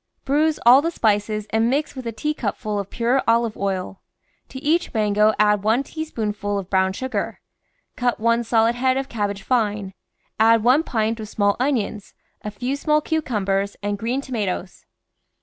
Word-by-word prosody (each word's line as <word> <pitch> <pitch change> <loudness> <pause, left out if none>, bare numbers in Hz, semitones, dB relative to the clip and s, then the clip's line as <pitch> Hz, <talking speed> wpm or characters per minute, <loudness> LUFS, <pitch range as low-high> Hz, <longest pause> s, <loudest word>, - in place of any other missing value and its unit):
Bruise 300 +3 +2
all 250 +3 +8
the 330 - 0
spices 215 -6 0
and 225 +1 +2
mix 285 +4 -1
with 260 -3 -6
a - - -2
teacupful 220 -5 -3
of 200 -1 -5
pure 245 +3 +1
olive 230 -1 +2
oil. 195 -1 -3 0.5
To 265 - -8
each 315 +1 0
mango 210 0 +3
add 210 -1 +3
one 220 +6 +2
teaspoonf 230 -10 -5
ul 205 0 0
of 195 -2 -6
brown 190 -1 +2
sugar; 260 +6 -3 0.6
cut 245 -1 0
one 230 +1 +2
solid 225 0 +2
head 260 +2 +1
of 270 0 -2
cabbage 205 -3 -3
fine, 210 -5 0 0.5
add 225 0 +5
one 255 +6 +5
pint 225 -6 -1
of 215 -1 -7
small 205 -2 +1
onions, 230 -6 -2 0.3
a 210 - -5
few 245 +7 -3
small 300 +1 +2
cucumbers, 205 -11 -1
and 205 0 -1
green 245 +5 -1
tomatoes. 205 -8 -4
225 Hz, 165 wpm, -22 LUFS, 205-260 Hz, 0.6 s, all